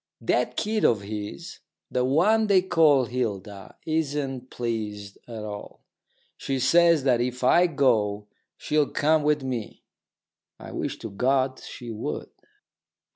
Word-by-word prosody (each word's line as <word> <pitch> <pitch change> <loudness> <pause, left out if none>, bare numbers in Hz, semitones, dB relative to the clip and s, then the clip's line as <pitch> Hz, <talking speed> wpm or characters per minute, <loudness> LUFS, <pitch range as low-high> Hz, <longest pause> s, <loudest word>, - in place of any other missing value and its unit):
That - - 0
kid 215 0 -1
of 110 -4 +3
his, 105 -7 -7 0.3
the 125 - +1
one 195 +12 +3
they 190 -3 +4
call 160 -8 +4
Hilda, 105 -5 -5
isn't 145 -5 -2
pleased 105 -4 -4
at 115 -3 -7
all. 105 -1 -8 0.5
She 135 - -2
says 165 +3 +4
that 125 -3 +3
if 125 +1 -3
I 175 +8 +5
go 110 -9 +1 0.3
she'll 150 -1 +1
come 155 +1 +2
with 150 -1 +1
me. 125 -5 -5 0.7
I - - -10
wish - - -4
to 110 - -5
God 130 +4 +1
she 120 -2 -8
would. 105 -8 -5
130 Hz, 130 wpm, -25 LUFS, 110-150 Hz, 0.7 s, I